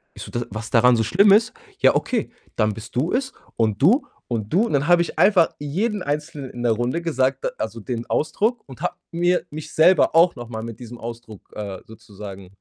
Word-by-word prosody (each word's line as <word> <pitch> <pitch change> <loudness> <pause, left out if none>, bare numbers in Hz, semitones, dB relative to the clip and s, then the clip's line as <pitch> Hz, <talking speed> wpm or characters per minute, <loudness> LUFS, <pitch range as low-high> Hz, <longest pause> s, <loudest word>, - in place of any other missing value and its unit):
Ich - - -8
so: - - -10
„D 120 - -2
was 110 +2 -6
daran 125 +1 +5
so 115 - +1
schlimm 195 - +4
ist? 225 +4 +3 0.3
Ja, - - +5
okay, 235 -4 -1 0.2
dann 105 -1 +1
bist 110 +3 -11
du 140 +7 0
es 265 +1 -1 0.2
und 110 -1 0
du 225 - +4 0.2
und 110 +1 -3
du 195 - +4
"und - - -4
dann 140 +2 +1
habe 175 -1 +5
ich - - -7
einfach 190 -5 +5
jeden 190 +8 -2
Einzelnen 145 -2 -4
in 120 - -7
der 120 - +3
Runde 120 +9 -1
gesagt, 135 -5 0
äh - - 0
also, 110 +1 -4
den 120 +1 -4
Ausdruck 220 +9 0
und 130 - -12
habe - - -2 0.2
mir 175 +1 +1
mich 155 0 -8
selber 165 +1 +4
auch 170 +1 +5
noch 120 - -7
mal 110 -2 -5
mit 115 -1 -8
diesem 120 -1 -9
Ausdruck, 115 -3 -9
äh, 100 -3 -5
sozusagen 100 -3 -11
130 Hz, 220 wpm, -22 LUFS, 115-170 Hz, 0.3 s, daran